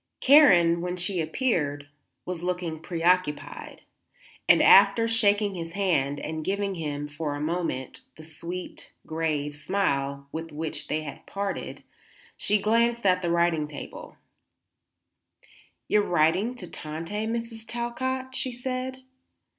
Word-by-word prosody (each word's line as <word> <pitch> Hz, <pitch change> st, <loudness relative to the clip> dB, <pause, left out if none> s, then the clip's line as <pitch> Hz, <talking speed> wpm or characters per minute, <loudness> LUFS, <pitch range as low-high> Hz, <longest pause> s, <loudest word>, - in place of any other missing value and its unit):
Karen, 180 Hz, -, +6 dB
when 180 Hz, +1 st, -3 dB
she 180 Hz, 0 st, -1 dB
appeared, 155 Hz, -, -1 dB, 0.4 s
was 180 Hz, -2 st, -4 dB
looking 175 Hz, -3 st, -3 dB
preoccupied, 170 Hz, -2 st, -1 dB, 0.7 s
and -, -, +8 dB
after 200 Hz, +4 st, +7 dB
shaking 205 Hz, -2 st, +2 dB
his 165 Hz, -2 st, -6 dB
hand 145 Hz, -8 st, +1 dB
and 155 Hz, +1 st, -4 dB
giving 200 Hz, +2 st, -1 dB
him, 145 Hz, -4 st, -4 dB
for 150 Hz, 0 st, -4 dB
a -, -, -5 dB
moment, 160 Hz, -4 st, -3 dB, 0.2 s
the 160 Hz, -, -12 dB
sweet, 170 Hz, +3 st, -8 dB
grave 155 Hz, -2 st, -2 dB
smile 140 Hz, -4 st, -1 dB
with 165 Hz, 0 st, -6 dB
which 155 Hz, +1 st, -5 dB
they 155 Hz, 0 st, -1 dB
had 145 Hz, -, -9 dB
parted, 200 Hz, -1 st, -4 dB, 0.5 s
she 210 Hz, +1 st, +1 dB
glanced 235 Hz, +2 st, +2 dB
at 185 Hz, -1 st, +4 dB
the 175 Hz, -, -1 dB
writing 170 Hz, -3 st, +2 dB
table. 150 Hz, -, -9 dB, 1.7 s
"You 210 Hz, -, +4 dB
are -, -, -3 dB
writing 175 Hz, +8 st, +2 dB
to 190 Hz, -7 st, -8 dB
Tante, 165 Hz, +9 st, -5 dB
Mrs. 230 Hz, -1 st, -4 dB
Talcott?" 260 Hz, +2 st, -3 dB
she 255 Hz, -, -2 dB
said. 255 Hz, +1 st, -4 dB
180 Hz, 130 wpm, -26 LUFS, 155-210 Hz, 1.7 s, and